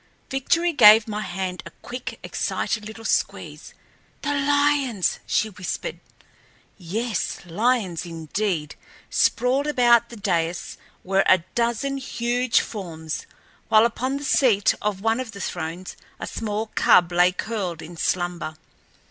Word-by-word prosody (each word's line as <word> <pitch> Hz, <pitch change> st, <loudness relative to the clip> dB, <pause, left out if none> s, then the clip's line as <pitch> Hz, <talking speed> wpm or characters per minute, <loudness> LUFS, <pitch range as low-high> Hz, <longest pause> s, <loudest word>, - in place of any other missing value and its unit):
Victory 335 Hz, +6 st, +1 dB
gave 220 Hz, -3 st, +8 dB
my 210 Hz, -1 st, -3 dB
hand 185 Hz, -1 st, -4 dB
a -, -, -9 dB
quick, 250 Hz, +1 st, -6 dB
excited 210 Hz, -2 st, -2 dB
little 225 Hz, +1 st, -10 dB
squeeze. -, -, -2 dB, 0.5 s
"The 290 Hz, -, 0 dB
lions!" 285 Hz, -6 st, +1 dB
she 220 Hz, -, +1 dB
whispered. 185 Hz, -, -5 dB, 0.8 s
Yes, 215 Hz, +5 st, -3 dB
lions 195 Hz, -2 st, 0 dB
indeed! 165 Hz, 0 st, -3 dB, 0.4 s
Sprawled 255 Hz, +4 st, +2 dB
about 240 Hz, -4 st, +4 dB
the 235 Hz, -, -9 dB
dais 175 Hz, -5 st, -2 dB, 0.2 s
were 195 Hz, +1 st, +2 dB
a 185 Hz, -3 st, +5 dB
dozen 240 Hz, +4 st, 0 dB
huge 245 Hz, -2 st, 0 dB
forms, 165 Hz, -7 st, -6 dB, 0.4 s
while 220 Hz, +1 st, +6 dB
upon 255 Hz, +4 st, -1 dB
the 285 Hz, -, -7 dB
seat 235 Hz, -8 st, +3 dB
of 205 Hz, -2 st, -2 dB
one 225 Hz, +2 st, +1 dB
of 255 Hz, -4 st, -5 dB
the 200 Hz, -, -9 dB
thrones 175 Hz, 0 st, -5 dB, 0.2 s
a -, -, -4 dB
small 215 Hz, 0 st, -4 dB
cub 175 Hz, -1 st, +5 dB
lay 175 Hz, +1 st, +4 dB
curled 185 Hz, -4 st, -4 dB
in 170 Hz, +2 st, -10 dB
slumber. 175 Hz, -2 st, -2 dB
215 Hz, 130 wpm, -23 LUFS, 180-245 Hz, 0.8 s, gave